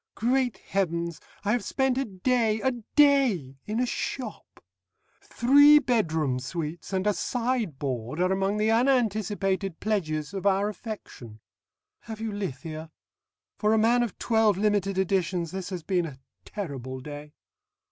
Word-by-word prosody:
"Great 245 0 +1
Heavens! 170 -3 -1 0.2
I 205 - +2
have 240 -1 +1
spent 265 +2 0
a 270 +1 0
day 220 +2 +1
a 265 - +2 0.2
day! 255 - +3
in 215 +2 -1
a 250 - +2
shop. 245 -2 -5 0.6
Three 285 +5 +6
bedroom 160 - +1
suites 160 +5 -5
and 190 0 -1
a 210 - +3
sideboard 155 - -2
are 185 +1 +2
among 195 +2 0
the 215 +1 +2
unanticipated 210 -6 +1
pledges 155 -8 -2
of 195 0 -1
our 200 +1 +2
affection. 185 - -9 0.7
Have 220 -1 -7
you 225 -1 -3
lithia? 160 -4 -5 0.7
For 210 0 +3
a - - +3
man 235 +3 +4
of 235 -5 -2
twelve 220 -4 +2
limited 200 -2 +1
editions 180 -3 0
this 190 0 -5
has 180 -4 -5
been 180 -2 0
a 135 -4 -10 0.3
terrible 135 - -6
day." 145 +2 -9
200 Hz, 140 wpm, -27 LUFS, 165-225 Hz, 0.7 s, Three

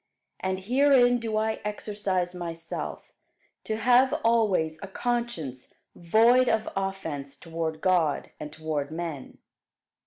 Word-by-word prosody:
And 190 0 -2
herein 245 +2 +4
do 225 -2 -2
I 220 0 -1
exercise 205 -4 -2
myself, 165 -2 -6 0.5
to 220 - -1
have 255 +5 +4
always 195 -9 +2
a 200 - -6
conscience 195 - -3 0.2
void 230 +8 +4
of 220 0 +1
offence 165 -8 -4
toward 160 0 -4
God, 175 -6 +1
and 150 0 -6
toward 155 -3 -3
men. 160 -4 -6
190 Hz, 115 wpm, -27 LUFS, 160-230 Hz, 0.5 s, herein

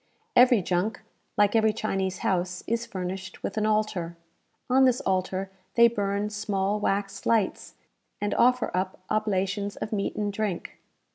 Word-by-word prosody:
Every 245 -5 +6
junk, 185 +4 -1 0.4
like 205 +1 +4
every 220 -1 +4
Chinese 190 -3 -2
house, 180 -1 0
is 230 +1 -1
furnished 185 -2 -6
with 200 - -3
an 215 0 +1
altar. 205 -6 0 0.5
On 265 +1 +5
this 255 -1 +3
altar 190 0 -1 0.2
they 235 0 +8
burn 205 -2 -1
small 205 0 -1
wax 200 -1 -1
lights, 220 -4 0 0.4
and 205 - -1
offer 250 -5 +3
up 185 0 -2
oblations 200 -1 0
of 215 - -5
meat 200 -2 -1
and 205 -1 -2
drink. 200 -4 -3
205 Hz, 145 wpm, -27 LUFS, 190-215 Hz, 0.5 s, they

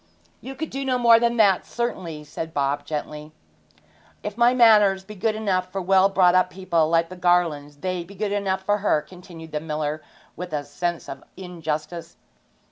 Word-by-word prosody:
'You 270 +1 -8
could 315 +3 -5
do 275 +1 -4
no 260 -2 0
more 235 -2 +6
than 235 0 +1
that, 200 -4 +4
certainly,' 175 -10 -4
said 160 +2 -7
Bob 140 +1 -1
gently. 150 0 -6 0.9
'If 210 -1 -5
my 240 +1 +4
manners 210 -6 +5
be 210 +2 -10
good 215 +2 -1
enough 185 -4 -1
for 195 - -3
well 190 +1 +4
brought 185 -2 +4
up 185 0 +3
people 170 -4 0
like 165 0 +2
the 185 - -8
Garlands, 170 -5 +1
they 185 +2 -3
be 195 +4 -14
good 205 +1 -2
enough 195 -2 -1
for 205 +2 +1
her,' 175 -7 +1
continued 170 -2 -12
the 150 - -2
miller, 155 0 -3 0.3
with 180 0 -7
a 145 -1 -1
sense 175 +3 -4
of - - -8
injustice. 165 -2 -5
180 Hz, 185 wpm, -23 LUFS, 160-205 Hz, 0.9 s, more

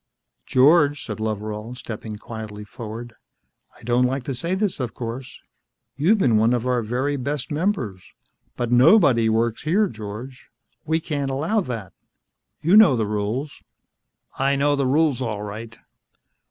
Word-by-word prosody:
"George," 145 +2 +4
said 105 -3 -6
Loveral, 110 +2 -4
stepping 110 -3 -7
quietly 105 -1 -8
forward, 115 +2 -8 0.7
"I - - -19
don't 120 +2 +2
like 130 +1 -1
to 135 - -3
say 170 +9 -2
this, 200 -4 -1
of 125 -3 -4
course. 120 +2 -6 0.6
You've 170 - +3
been 120 - +3
one 115 +3 +3
of 120 0 -2
our 125 -1 +1
very 130 +6 -1
best 140 +1 -4
members. 145 - -1 0.6
But 120 -1 -2
nobody 125 - +5
works 115 +1 0
here, 195 +7 +2
George. 110 - -9 0.4
We 160 +1 +1
can't 145 -4 -2
allow 155 +11 0
that. 115 - -5 0.7
You 170 +6 +4
know 195 -12 +7
the 110 -2 0
rules." 105 +7 -3 0.8
"I 135 +1 +2
know 145 +1 +2
the 140 -2 0
rules, 145 -1 +2
all 110 -4 -3
right." 110 +2 -8
125 Hz, 150 wpm, -23 LUFS, 110-145 Hz, 0.8 s, know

